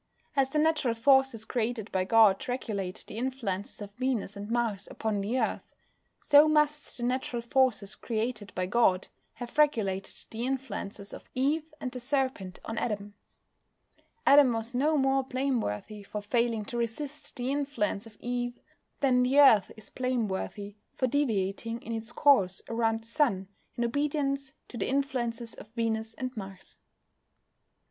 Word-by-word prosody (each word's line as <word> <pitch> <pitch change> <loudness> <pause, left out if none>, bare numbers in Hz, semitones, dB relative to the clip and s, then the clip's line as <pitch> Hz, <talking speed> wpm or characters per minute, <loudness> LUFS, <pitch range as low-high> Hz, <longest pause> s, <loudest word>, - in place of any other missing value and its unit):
As 270 -2 +3
the 300 - -2
natural 300 -6 +2
forces 265 -2 +3
created 230 -2 -2
by 185 -1 +1
God 215 -2 +5
regulate 200 -7 -3
the - - -8
influences 225 -6 -3
of 200 0 -10
Venus 250 -6 -1
and 205 +1 -7
Mars 230 -4 -1
upon 215 -2 -2
the 230 +6 0
Earth, - - 0 0.6
so 290 +1 +7
must 300 -1 +1
the 240 - -4
natural 245 -1 -1
forces 240 -5 +2
created 220 -3 -3
by 185 - 0
God 190 -2 +2 0.2
have 245 -4 -8
regulated 200 -10 +2 0.2
the 225 +1 -4
influences 250 -6 -4
of - - -11
Eve 300 +5 0
and 255 - -4
the 250 - -6
Serpent 255 -8 -1
on 225 0 -3
Adam. 205 -2 -3 1.1
Adam 280 -3 +7
was 225 +2 -3
no 300 +5 +2
more 270 0 +3
blameworthy 245 - -2
for 205 +1 -6
failing 230 0 0
to 240 - -5
resist 275 +6 -4
the 250 0 -2
influence 255 -8 -1
of 210 -2 -16
Eve 245 0 -3 0.4
than 255 -3 +4
the 260 +3 +3
Earth 220 -9 +7
is 215 - -10
blameworthy 215 -5 -2 0.2
for 260 - +1
deviating 230 -4 0
in 230 - -5
its 225 +1 -4
course 200 -13 +3
around 225 -1 0
the - - -11
Sun, 230 -8 +1 0.3
in 240 - -1
obedience 275 +1 -1
to 240 - -9
the - - -1
influences 245 -4 -1
of - - -11
Venus 225 -1 -1
and 255 -1 -5
Mars. 195 -3 -9
235 Hz, 155 wpm, -29 LUFS, 210-265 Hz, 1.1 s, so